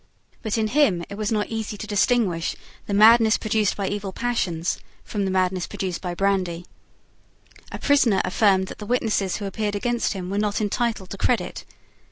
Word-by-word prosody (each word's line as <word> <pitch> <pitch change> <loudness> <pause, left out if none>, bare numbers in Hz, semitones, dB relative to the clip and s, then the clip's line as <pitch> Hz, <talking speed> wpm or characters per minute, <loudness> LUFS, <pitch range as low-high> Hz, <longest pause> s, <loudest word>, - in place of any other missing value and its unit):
But 220 -1 -2
in 220 -1 0
him 225 - +3
it 200 - -6
was 210 +1 -2
not 210 -2 0
easy 220 -2 -4
to 215 - -6
distinguish 205 -4 +1 0.3
the 205 - -2
madness 220 +1 +6
produced 215 -2 0
by 200 -1 -1
evil 200 -1 -3
passions 185 -7 -1 0.2
from 205 -2 -3
the - - -1
madness 185 -1 0
produced 185 -3 -4
by 180 -2 -4
brandy. 185 -3 0 1.1
A - - -5
prisoner 260 -9 +3
affirmed 190 0 +3
that - - -9
the 210 - -7
witnesses 215 -6 0
who 205 - -4
appeared 205 +1 -2
against 240 +3 0
him 185 -2 -5
were 200 - 0
not 210 -1 0
entitled 215 -2 -1
to 195 - -5
credit. 200 -8 -1
205 Hz, 180 wpm, -23 LUFS, 190-220 Hz, 1.1 s, madness